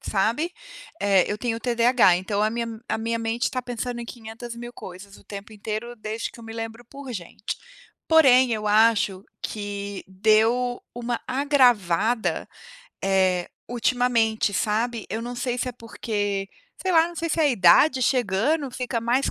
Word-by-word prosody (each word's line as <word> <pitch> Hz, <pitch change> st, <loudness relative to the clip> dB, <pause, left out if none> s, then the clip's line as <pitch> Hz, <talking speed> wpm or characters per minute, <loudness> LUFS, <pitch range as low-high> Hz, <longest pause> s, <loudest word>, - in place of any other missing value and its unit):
sabe. 235 Hz, -, 0 dB, 0.5 s
Eh, 195 Hz, -2 st, +4 dB
eu 205 Hz, -, -1 dB
tenho 230 Hz, -1 st, -2 dB
TDAH, 235 Hz, -6 st, +4 dB
então 200 Hz, +3 st, -1 dB
a 215 Hz, -, +3 dB
minha 235 Hz, +1 st, -2 dB, 0.2 s
a -, -, 0 dB
minha 230 Hz, +1 st, -1 dB
mente 230 Hz, +2 st, -2 dB
está 255 Hz, -, -1 dB
pensando 245 Hz, 0 st, -4 dB
em 235 Hz, -, -5 dB
quinhentas 230 Hz, 0 st, -8 dB
mil 240 Hz, +1 st, -8 dB
coisas 195 Hz, 0 st, -11 dB
o -, -, -19 dB
tempo 205 Hz, +1 st, -9 dB
inteiro 215 Hz, +3 st, -5 dB
desde 215 Hz, +1 st, -4 dB
que -, -, -16 dB
eu -, -, -11 dB
me 225 Hz, -, -8 dB
lembro 225 Hz, +1 st, -6 dB
por 275 Hz, +1 st, -9 dB
gente. 190 Hz, +1 st, -6 dB, 0.5 s
Porém 260 Hz, -6 st, +6 dB
eu 215 Hz, -1 st, -2 dB
acho 210 Hz, -3 st, +3 dB, 0.2 s
que 200 Hz, -1 st, -5 dB
deu 220 Hz, +5 st, +2 dB
uma 240 Hz, 0 st, -3 dB
agravada, 245 Hz, -, +2 dB, 0.5 s
eh, 185 Hz, -2 st, +2 dB, 0.2 s
ultimamente, 235 Hz, -3 st, +1 dB
sabe, 220 Hz, +3 st, -1 dB
eu 220 Hz, +2 st, -3 dB
não 245 Hz, +1 st, -5 dB
sei 245 Hz, 0 st, -2 dB
se 250 Hz, -, -1 dB
é -, -, -4 dB
porque 205 Hz, -4 st, -3 dB, 0.3 s
sei 375 Hz, -1 st, 0 dB
lá, 330 Hz, 0 st, +5 dB
não 345 Hz, -, -11 dB
sei 335 Hz, +1 st, -2 dB
se 325 Hz, -, 0 dB
a 305 Hz, -, +5 dB
idade 255 Hz, -, +5 dB
chegando 255 Hz, +5 st, +1 dB
fica 245 Hz, -1 st, -3 dB
mais 245 Hz, +4 st, +1 dB
230 Hz, 165 wpm, -24 LUFS, 210-245 Hz, 0.5 s, Porém